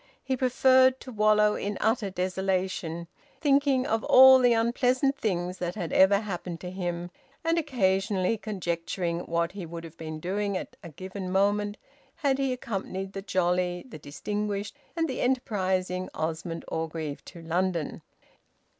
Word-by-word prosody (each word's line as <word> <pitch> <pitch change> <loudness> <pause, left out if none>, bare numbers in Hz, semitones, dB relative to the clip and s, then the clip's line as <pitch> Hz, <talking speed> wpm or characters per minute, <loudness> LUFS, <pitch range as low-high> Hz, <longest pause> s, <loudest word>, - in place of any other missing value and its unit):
He 265 - -1
preferred 260 +1 +4
to 260 - -9
wallow 210 -1 +4
in 205 -1 -3
utter 220 -2 +1
desolation, 185 -2 -2 0.3
thinking 280 -3 +3
of 225 -5 0
all 260 0 +9
the 245 -1 +4
unpleasant 250 +4 +2
things 180 -6 -2
that 175 +1 -3
had 175 -6 -4
ever 200 +2 +5
happened 180 -4 -5
to 180 - -6
him, 175 -1 -4 0.3
and 330 +1 +2
occasionally 195 - +1
conjecturing 175 -4 -3
what 170 -1 -1
he 195 -1 -7
would 170 0 -7
have 165 0 -11
been 155 -1 -6
doing 200 +3 -1
at - - -7
a 170 - -8
given 185 +4 -7
moment 205 +2 +1 0.4
had 275 -3 0
he 270 -1 +1
accompanied 195 -6 -4
the 195 - -5
jolly, 180 -2 0
the 220 - -10
distinguished, 205 - -4 0.2
and 330 -1 +1
the 260 - -3
enterprising 185 -7 0
Osmond 165 +1 -3
Orgreave 160 -2 -4
to 170 -2 -11
London. 170 -1 -1
190 Hz, 145 wpm, -27 LUFS, 175-230 Hz, 0.4 s, all